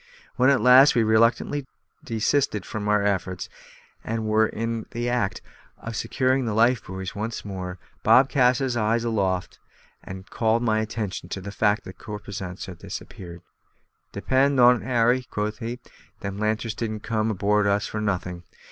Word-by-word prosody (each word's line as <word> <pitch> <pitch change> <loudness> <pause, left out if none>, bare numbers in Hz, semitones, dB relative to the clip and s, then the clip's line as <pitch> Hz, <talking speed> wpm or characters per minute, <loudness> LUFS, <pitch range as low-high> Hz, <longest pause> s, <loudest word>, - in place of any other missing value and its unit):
When 130 +2 +4
at 135 -4 +3
last 130 +4 +7
we 120 - +4
reluctantly 115 +5 +2 0.4
desisted 110 -1 0
from 105 -1 -5
our 105 -1 +3
efforts, 95 -2 -2 0.5
and 115 0 -3
were 110 0 +3
in 115 0 -4
the 120 +1 -3
act 115 -7 -1 0.3
of 115 0 -7
securing 130 +4 0
the 110 -2 -2
lifebuoys 105 -5 +1
once 110 +2 -5
more, 95 -2 -5 0.2
Bob 130 +1 +6
cast 125 -3 +3
his 130 -2 -1
eyes 115 +1 +1
aloft, 95 -6 -1 0.4
and 95 +1 -9
called 115 +1 +1
my 110 -2 +2
attention 105 -5 -4
to 95 - -4
the 100 +2 -7
fact 105 0 +1
that 95 - -11
the - - -18
corposants 100 -3 -6
had 90 -3 -10
disappeared. 85 -1 -9 0.7
"Depend 135 +1 +1
on't, 125 -2 +6
Harry," 120 +2 +2
quoth 105 +2 -3
he, 120 +1 -5 0.4
"them 100 0 -5
lanterns 110 +1 -1
didn't 110 -1 -4
come 110 0 -1
aboard 105 0 +1
of 100 - +4
us 100 +1 -1
for 110 - -4
nothing. 90 -4 -2
110 Hz, 165 wpm, -24 LUFS, 100-120 Hz, 0.7 s, last